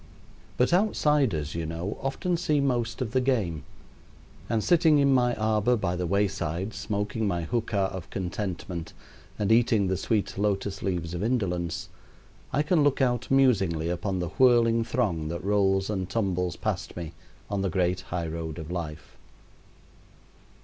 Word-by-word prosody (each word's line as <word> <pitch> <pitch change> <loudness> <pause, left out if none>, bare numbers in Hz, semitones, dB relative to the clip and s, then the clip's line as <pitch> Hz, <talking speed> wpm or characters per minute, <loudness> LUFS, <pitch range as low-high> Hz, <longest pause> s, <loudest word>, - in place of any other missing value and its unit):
But 125 +7 +3
outsiders, 150 - +2
you 85 -1 -3
know, 85 +5 -4
often 155 +6 -1
see 155 -3 +1
most 125 -3 0
of 110 - -5
the 130 +1 +2
game; 105 - 0 0.9
and 110 -2 +1
sitting 160 -3 +4
in 140 -1 +4
my 125 -2 +3
arbor 110 +2 +2
by 95 -6 -1
the 90 -1 -2
wayside, 95 0 -1
smoking 105 +1 -2
my 85 -3 -1
hookah 100 0 -1
of 95 -3 -7
contentment 90 -2 -4 0.4
and 105 0 0
eating 115 -3 +4
the 95 0 0
sweet 100 0 -1
lotus 100 -1 -1
leaves 85 -3 -2
of 85 - -3
indolence, 95 -8 -1 0.6
I 145 +3 +2
can 155 0 +3
look 145 -2 +2
out 125 -3 +1
musingly 95 -12 +3
upon 95 +2 -2
the 90 -2 -2
whirling 120 -3 +5
throng 105 -10 -1
that 85 0 -4
rolls 95 -1 +2
and 95 -3 -3
tumbles 95 -4 -1
past - - -3
me 85 -2 -6 0.3
on 100 -1 -2
the 95 - 0
great 90 0 0
high 90 -2 -4
road 80 -1 -5
of 80 0 -7
life. 85 -3 -6
100 Hz, 155 wpm, -27 LUFS, 90-120 Hz, 0.9 s, whirling